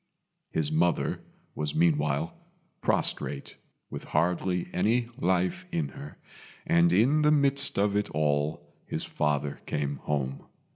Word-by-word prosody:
His 75 Hz, -2 st, -1 dB
mother 85 Hz, +2 st, +1 dB, 0.3 s
was 75 Hz, -1 st, -3 dB
meanwhile 75 Hz, -1 st, +2 dB, 0.5 s
prostrate, 70 Hz, -1 st, -1 dB, 0.3 s
with -, -, -6 dB
hardly 90 Hz, +3 st, 0 dB
any 115 Hz, +6 st, +2 dB
life 95 Hz, -, 0 dB
in 165 Hz, -4 st, -1 dB
her, 145 Hz, +1 st, -10 dB, 0.5 s
and 85 Hz, 0 st, +4 dB
in 125 Hz, -, +4 dB
the 150 Hz, -, +5 dB
midst 140 Hz, -2 st, +2 dB
of 100 Hz, 0 st, +2 dB
it 105 Hz, 0 st, 0 dB
all 75 Hz, 0 st, 0 dB, 0.2 s
his -, -, -3 dB
father 75 Hz, -1 st, -1 dB
came 70 Hz, -1 st, -1 dB
home. 70 Hz, -1 st, -3 dB
85 Hz, 125 wpm, -28 LUFS, 75-110 Hz, 0.5 s, the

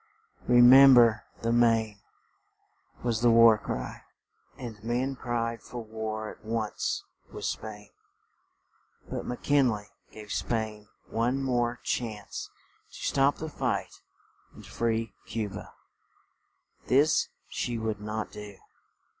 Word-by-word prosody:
"Re 120 Hz, 0 st, +6 dB
mem 135 Hz, +2 st, +9 dB
ber 115 Hz, -3 st, +5 dB, 0.2 s
the 115 Hz, -, +1 dB
Maine," 115 Hz, -3 st, +2 dB, 1.0 s
was 115 Hz, -2 st, 0 dB
the 120 Hz, -, +5 dB
war 115 Hz, -1 st, +7 dB
cry; -, -, -5 dB, 0.6 s
and 110 Hz, -4 st, -8 dB
men 125 Hz, +4 st, -1 dB
cried 115 Hz, -2 st, -3 dB
for 125 Hz, -, -10 dB
war 110 Hz, 0 st, -5 dB
at -, -, -16 dB
once 110 Hz, -1 st, -2 dB, 0.3 s
with -, -, -6 dB
Spain. 105 Hz, -1 st, -5 dB, 1.2 s
But -, -, -4 dB
Mc 125 Hz, -, -5 dB
Kin 140 Hz, -3 st, +4 dB
ley 105 Hz, -2 st, -4 dB, 0.2 s
gave 105 Hz, -2 st, -10 dB
Spain 110 Hz, -2 st, -3 dB, 0.2 s
one 125 Hz, +4 st, 0 dB
more 120 Hz, -2 st, 0 dB
chance 110 Hz, -4 st, -4 dB, 0.4 s
to -, -, -16 dB
stop 140 Hz, +1 st, +2 dB
the 160 Hz, -, -6 dB
fight 155 Hz, -, -3 dB, 0.5 s
and -, -, -13 dB
free 115 Hz, -1 st, -2 dB, 0.2 s
Cu 110 Hz, -2 st, -2 dB
ba; 100 Hz, +2 st, -9 dB, 1.2 s
this 145 Hz, +4 st, +3 dB, 0.2 s
she 120 Hz, -1 st, -3 dB
would 110 Hz, -2 st, -3 dB
not 105 Hz, +1 st, -4 dB
do. 105 Hz, -1 st, -9 dB
115 Hz, 125 wpm, -28 LUFS, 110-120 Hz, 1.2 s, mem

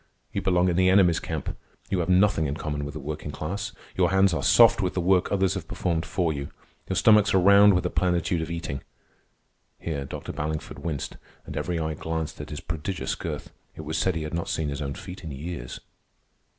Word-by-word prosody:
You -, -, -1 dB
belong 90 Hz, -1 st, +3 dB
in 90 Hz, -1 st, +1 dB
the 95 Hz, 0 st, +5 dB
enemy's 95 Hz, -4 st, +5 dB
camp. -, -, -4 dB, 0.4 s
You 95 Hz, -, +1 dB
have 85 Hz, 0 st, -1 dB
nothing 90 Hz, -4 st, +4 dB
in 70 Hz, -, -2 dB
common 75 Hz, -2 st, -3 dB
with 75 Hz, -, -7 dB
the -, -, -4 dB
working 75 Hz, +1 st, -5 dB
class. 95 Hz, +7 st, -4 dB, 0.2 s
Your -, -, +3 dB
hands 95 Hz, -1 st, +4 dB
are -, -, -1 dB
soft 115 Hz, -1 st, +6 dB
with 90 Hz, -2 st, -1 dB
the -, -, +1 dB
work 90 Hz, +1 st, +2 dB
others 95 Hz, -1 st, +2 dB
have 90 Hz, -5 st, -5 dB
performed 85 Hz, -1 st, -2 dB
for 85 Hz, -4 st, 0 dB
you. 70 Hz, -1 st, -5 dB, 0.4 s
Your 95 Hz, -, 0 dB
stomachs 105 Hz, +3 st, +5 dB
are -, -, +6 dB
round 100 Hz, +1 st, +7 dB
with 90 Hz, -, +1 dB
the 90 Hz, -, -1 dB
plenitude 85 Hz, 0 st, +1 dB
of 80 Hz, -, -4 dB
eating." 85 Hz, -5 st, -4 dB, 1.0 s
(Here 75 Hz, -4 st, -4 dB
Dr. -, -, -6 dB
Ballingford 75 Hz, +1 st, -4 dB
winced, 75 Hz, -6 st, -4 dB, 0.3 s
and -, -, -7 dB
every 85 Hz, +3 st, -2 dB
eye 80 Hz, -1 st, -1 dB
glanced 80 Hz, 0 st, -4 dB
at 75 Hz, -, -8 dB
his 75 Hz, -, -6 dB
prodigious 85 Hz, +3 st, -3 dB
girth. -, -, -5 dB, 0.2 s
It -, -, -7 dB
was 80 Hz, +1 st, -4 dB
said 90 Hz, +2 st, +1 dB
he 80 Hz, -, -2 dB
had 75 Hz, -, -6 dB
not 85 Hz, 0 st, -2 dB
seen 80 Hz, -2 st, -1 dB
his 70 Hz, +1 st, -4 dB
own 70 Hz, -2 st, -3 dB
feet 90 Hz, +1 st, -9 dB
in 80 Hz, -, -5 dB
years.) 75 Hz, -2 st, -6 dB
85 Hz, 215 wpm, -26 LUFS, 75-95 Hz, 1.0 s, round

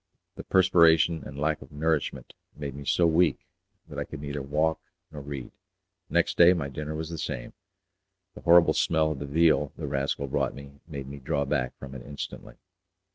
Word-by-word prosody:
The -, -, -9 dB
perspiration 85 Hz, -3 st, +4 dB
and 70 Hz, -, -9 dB
the -, -, -5 dB
lack 75 Hz, 0 st, 0 dB
of -, -, -13 dB
nourishment 80 Hz, 0 st, -1 dB, 0.2 s
made 70 Hz, -2 st, -5 dB
me 70 Hz, +1 st, -9 dB
so 85 Hz, -, +3 dB
weak 85 Hz, +1 st, +2 dB, 0.4 s
that -, -, -7 dB
I -, -, -1 dB
could -, -, -9 dB
neither 70 Hz, -1 st, -4 dB
walk 75 Hz, +4 st, 0 dB, 0.3 s
nor 75 Hz, -2 st, -8 dB
read. 70 Hz, -3 st, -7 dB, 0.6 s
Next -, -, +1 dB
day 85 Hz, +1 st, +8 dB
my 80 Hz, -6 st, -3 dB
dinner 75 Hz, +3 st, -5 dB
was 80 Hz, +1 st, -5 dB
the 80 Hz, -, -5 dB
same; -, -, -5 dB, 0.8 s
the -, -, -11 dB
horrible 85 Hz, -2 st, +6 dB
smell 80 Hz, -1 st, +2 dB
of 75 Hz, -, -4 dB
the 70 Hz, -, -5 dB
veal 75 Hz, -1 st, +3 dB
the -, -, -5 dB
rascal 70 Hz, +1 st, -1 dB
brought 65 Hz, -, -1 dB
me 70 Hz, 0 st, -12 dB
made 70 Hz, -4 st, -7 dB
me 70 Hz, +1 st, -8 dB
draw 70 Hz, +2 st, -1 dB
back 65 Hz, -2 st, -1 dB
from 70 Hz, -1 st, -9 dB
it 65 Hz, -, -8 dB
instantly. 70 Hz, +3 st, -8 dB
75 Hz, 190 wpm, -27 LUFS, 70-80 Hz, 0.8 s, day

